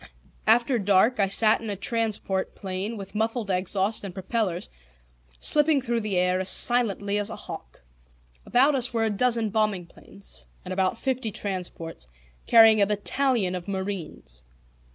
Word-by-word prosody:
After 235 Hz, +2 st, +3 dB
dark 205 Hz, +4 st, +3 dB
I 200 Hz, -, +3 dB
sat 215 Hz, +3 st, +3 dB
in 225 Hz, -, -6 dB
a 205 Hz, -, -2 dB
transport 210 Hz, -2 st, -1 dB
plane 195 Hz, +4 st, -5 dB
with 195 Hz, -1 st, -9 dB
muffled 220 Hz, -1 st, -2 dB
exhaust 190 Hz, +4 st, 0 dB
and 195 Hz, -2 st, -7 dB
propellers, 190 Hz, -2 st, -2 dB, 0.7 s
slipping 300 Hz, -1 st, +3 dB
through 240 Hz, -3 st, -1 dB
the 210 Hz, -4 st, -2 dB
air 180 Hz, +1 st, +2 dB
as 190 Hz, 0 st, -1 dB
silently 205 Hz, -3 st, +2 dB
as 205 Hz, +1 st, -2 dB
a 220 Hz, -, -6 dB
hawk. 60 Hz, 0 st, -9 dB, 0.6 s
About 270 Hz, +5 st, +3 dB
us 255 Hz, -2 st, 0 dB
were 225 Hz, -2 st, 0 dB
a 220 Hz, -, 0 dB
dozen 230 Hz, 0 st, 0 dB
bombing 210 Hz, -4 st, 0 dB
planes, 200 Hz, +3 st, -12 dB, 0.2 s
and 185 Hz, -, -4 dB
about 190 Hz, +3 st, 0 dB
fifty 260 Hz, -2 st, -2 dB
transports, 180 Hz, -, -5 dB, 0.4 s
carrying 225 Hz, -2 st, +7 dB
a 200 Hz, -, +4 dB
battalion 210 Hz, -1 st, 0 dB
of 180 Hz, 0 st, -6 dB
marines. 190 Hz, -, -6 dB
205 Hz, 155 wpm, -25 LUFS, 190-230 Hz, 0.7 s, carrying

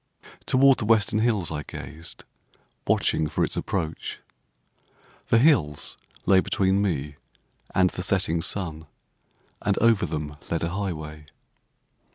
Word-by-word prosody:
Toward 135 Hz, 0 st, +5 dB
the 110 Hz, -, -2 dB
western 105 Hz, -1 st, +3 dB
hills 110 Hz, -7 st, +1 dB
I 75 Hz, -1 st, -3 dB
gazed, 80 Hz, +2 st, -8 dB, 0.6 s
watching 80 Hz, -, +2 dB
for -, -, 0 dB
its -, -, -4 dB
approach. 80 Hz, -5 st, -3 dB, 1.1 s
The 115 Hz, -, +4 dB
hills 80 Hz, -, +2 dB, 0.3 s
lay 95 Hz, 0 st, +6 dB
between 95 Hz, +1 st, +1 dB
me 75 Hz, -7 st, -2 dB, 0.6 s
and 95 Hz, -1 st, +4 dB
the -, -, -5 dB
setting 90 Hz, -3 st, +1 dB
sun, 80 Hz, -4 st, -3 dB, 0.7 s
and 100 Hz, -1 st, +1 dB
over 115 Hz, -5 st, +3 dB
them 75 Hz, -1 st, -4 dB
led 85 Hz, -1 st, -1 dB
a 85 Hz, -, 0 dB
highway. 80 Hz, -5 st, -5 dB
90 Hz, 125 wpm, -25 LUFS, 80-100 Hz, 1.1 s, lay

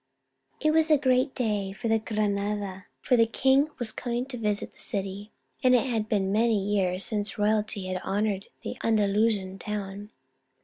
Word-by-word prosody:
It 310 Hz, -, +2 dB
was 320 Hz, 0 st, +4 dB
a 305 Hz, -, +6 dB
great 260 Hz, 0 st, +2 dB
day 210 Hz, -5 st, -1 dB
for 225 Hz, +3 st, 0 dB
Granada, 205 Hz, -3 st, -2 dB
for 250 Hz, -, +3 dB
the 230 Hz, -1 st, +4 dB
king 270 Hz, +5 st, +3 dB
was 240 Hz, -3 st, -3 dB
coming 240 Hz, 0 st, -3 dB
to 265 Hz, -2 st, -7 dB
visit 210 Hz, -2 st, 0 dB
the -, -, -25 dB
city, 200 Hz, +1 st, -5 dB, 0.3 s
and 255 Hz, 0 st, +6 dB
it 245 Hz, -, +3 dB
had 225 Hz, -4 st, -2 dB
been 195 Hz, -3 st, +1 dB
many 225 Hz, +1 st, +3 dB
years 195 Hz, -2 st, +1 dB
since 210 Hz, -2 st, -2 dB
royalty 210 Hz, -1 st, 0 dB
had 185 Hz, 0 st, -3 dB
honoured 200 Hz, 0 st, -1 dB, 0.2 s
the -, -, -5 dB
Andalusian 205 Hz, -3 st, +1 dB
town. 205 Hz, -1 st, -5 dB
210 Hz, 165 wpm, -27 LUFS, 200-235 Hz, 0.3 s, a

